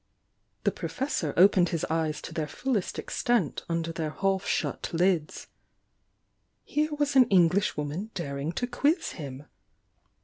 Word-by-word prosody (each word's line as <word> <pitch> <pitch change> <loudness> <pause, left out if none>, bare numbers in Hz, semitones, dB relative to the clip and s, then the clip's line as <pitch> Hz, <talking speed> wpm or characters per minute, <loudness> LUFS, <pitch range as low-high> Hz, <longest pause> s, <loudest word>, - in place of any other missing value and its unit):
The - - +3
Professor 255 - -2
opened 180 -1 +6
his 165 - -1
eyes 160 -1 -1
to - - -7
their 155 -2 -2
fullest 230 - -2
ex - - -4
tent 235 - +1
under 165 0 -1
their 165 -2 -3
half 195 +4 -1
shut - - -1
lids. 170 -2 +1 1.2
Here 305 +1 0
was 290 -1 0
an 255 -3 +7
Eng 180 -4 +6
lishwoman 180 0 -1
daring 140 -2 -3
to 245 - -1
quiz 285 +7 +1
him! 140 -3 -7
175 Hz, 140 wpm, -28 LUFS, 155-230 Hz, 1.2 s, an